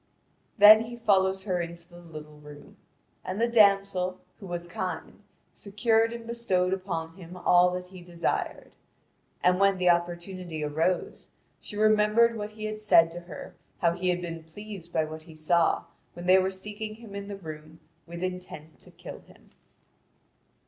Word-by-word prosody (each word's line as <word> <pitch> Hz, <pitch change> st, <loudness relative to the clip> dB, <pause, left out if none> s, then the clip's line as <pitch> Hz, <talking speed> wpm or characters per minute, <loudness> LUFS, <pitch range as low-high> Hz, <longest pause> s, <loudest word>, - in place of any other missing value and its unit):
Then 215 Hz, +2 st, +9 dB
he 240 Hz, +1 st, -8 dB
followed 195 Hz, -5 st, +2 dB
her 180 Hz, -3 st, -1 dB
into 170 Hz, 0 st, -8 dB
the 175 Hz, -1 st, -14 dB
little 155 Hz, -3 st, -11 dB
room. 150 Hz, -1 st, -13 dB, 0.5 s
The 205 Hz, +6 st, -1 dB
damsel, 200 Hz, -5 st, +3 dB, 0.2 s
who 195 Hz, -, -9 dB
was 175 Hz, -1 st, -5 dB
kind, 180 Hz, +2 st, -5 dB, 0.3 s
secured 225 Hz, +2 st, +1 dB
and 235 Hz, -1 st, -7 dB
bestowed 195 Hz, -6 st, 0 dB
upon 170 Hz, -3 st, -4 dB
him 180 Hz, -1 st, -10 dB
all 180 Hz, 0 st, +5 dB
that 180 Hz, 0 st, -6 dB
he 185 Hz, -1 st, -12 dB
desired. 175 Hz, -1 st, -3 dB, 0.7 s
And 180 Hz, +1 st, +4 dB
when 195 Hz, -1 st, +4 dB
the 180 Hz, -1 st, +4 dB
opportunity 175 Hz, -1 st, -3 dB
arose, 160 Hz, +5 st, -1 dB, 0.3 s
she 205 Hz, -, -8 dB
remembered 215 Hz, +2 st, +4 dB
what 210 Hz, -1 st, -4 dB
he 215 Hz, 0 st, -8 dB
had 215 Hz, 0 st, -5 dB
said 165 Hz, -6 st, +5 dB
to 175 Hz, -, -7 dB
her -, -, -9 dB, 0.2 s
how 170 Hz, -, +2 dB
he 180 Hz, +2 st, -2 dB
had 180 Hz, 0 st, 0 dB
been 165 Hz, -1 st, -6 dB
pleased 185 Hz, +1 st, -9 dB
by 160 Hz, -, +1 dB
what 155 Hz, 0 st, -8 dB
he 160 Hz, 0 st, -15 dB
saw 165 Hz, +2 st, +2 dB, 0.3 s
when 175 Hz, 0 st, -9 dB
they 185 Hz, +1 st, +6 dB
were 190 Hz, 0 st, +1 dB
seeking 210 Hz, +3 st, -6 dB
him 225 Hz, -2 st, -13 dB
in 200 Hz, 0 st, -6 dB
the 200 Hz, -, -5 dB
room 155 Hz, -2 st, -10 dB, 0.3 s
with 170 Hz, +1 st, -7 dB
intent 180 Hz, -4 st, -6 dB
to -, -, -14 dB
kill -, -, -10 dB
him. -, -, -21 dB
185 Hz, 165 wpm, -27 LUFS, 170-205 Hz, 0.7 s, Then